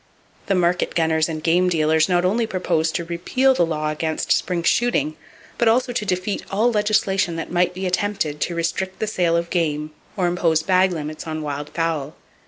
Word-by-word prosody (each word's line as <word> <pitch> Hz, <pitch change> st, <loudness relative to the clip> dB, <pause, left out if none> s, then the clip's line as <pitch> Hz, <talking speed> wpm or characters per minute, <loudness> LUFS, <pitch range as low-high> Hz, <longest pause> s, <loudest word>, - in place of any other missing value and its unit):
The 195 Hz, -, +2 dB
market 180 Hz, 0 st, +1 dB
gunners 160 Hz, -1 st, +2 dB
and 155 Hz, -1 st, -5 dB
game 180 Hz, +2 st, +3 dB
dealers 160 Hz, -1 st, +2 dB
not 175 Hz, 0 st, +2 dB
only 220 Hz, +5 st, +1 dB
proposed 170 Hz, -5 st, -1 dB
to 170 Hz, -, -2 dB
repeal 180 Hz, +11 st, +1 dB
the 175 Hz, -9 st, +2 dB
law 155 Hz, -1 st, -1 dB
against 155 Hz, +1 st, -2 dB
spring 175 Hz, -2 st, +1 dB
shooting 160 Hz, -, +1 dB, 0.4 s
but 235 Hz, -, +3 dB
also 245 Hz, +2 st, +2 dB
to 210 Hz, -, -2 dB
defeat 185 Hz, +2 st, -1 dB
all 220 Hz, +5 st, +2 dB
legislation 205 Hz, -5 st, +1 dB
that 165 Hz, -, -5 dB
might 180 Hz, 0 st, +1 dB
be 190 Hz, +1 st, -4 dB
attempted 180 Hz, -5 st, -1 dB
to 175 Hz, -, -1 dB
restrict 185 Hz, +3 st, -2 dB
the -, -, -1 dB
sale 175 Hz, -5 st, +1 dB
of 170 Hz, 0 st, -3 dB
game, 155 Hz, -3 st, -1 dB, 0.3 s
or 185 Hz, -, +1 dB
impose 170 Hz, -2 st, +1 dB
bag 185 Hz, 0 st, +3 dB
limits 155 Hz, -1 st, -5 dB
on 155 Hz, -1 st, -4 dB
wild 145 Hz, 0 st, -4 dB
fowl. 160 Hz, -4 st, -2 dB
175 Hz, 190 wpm, -21 LUFS, 160-190 Hz, 0.4 s, game